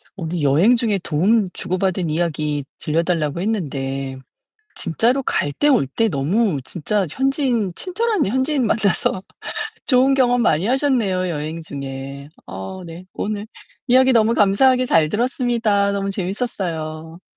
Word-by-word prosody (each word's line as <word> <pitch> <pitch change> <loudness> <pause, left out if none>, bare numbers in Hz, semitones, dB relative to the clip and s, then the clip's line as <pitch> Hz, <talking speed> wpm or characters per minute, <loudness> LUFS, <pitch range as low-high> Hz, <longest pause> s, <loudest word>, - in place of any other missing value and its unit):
우리 165 -3 -3
여행 160 - +4
중에 220 -5 0
도움 190 +6 +2
주고 185 - -2
받은 185 -3 0
이야기 150 -3 -1
들려 155 +2 0
달라고 165 -2 -1
했는데 135 -10 -3 0.6
진짜로 240 - +1
갈 145 - -1
때 295 - +1
올 250 - +3
때 225 +12 0
너무 170 +3 0
진짜 195 +3 -1
현지인 260 - 0
친절한 420 - 0
현지인 260 +4 0
만나서 200 -3 +1 0.6
좋은 265 +1 +4
경험 245 -2 +3
많이 165 -2 +2
하셨네요, 235 -9 +1
여행 155 +1 -4
중에. 140 -1 -7 0.2
어 95 - -7
네. 170 +2 -9
오늘 210 0 -4 0.4
이야기 260 +1 +5
너무 225 -1 +4
감사하게 250 +6 +4
잘 160 -6 +3
들었습니다. 230 - +1
너무 200 0 -2
재밌었어요. 175 -5 -4
195 Hz, 295 characters per minute, -20 LUFS, 155-240 Hz, 0.6 s, 이야기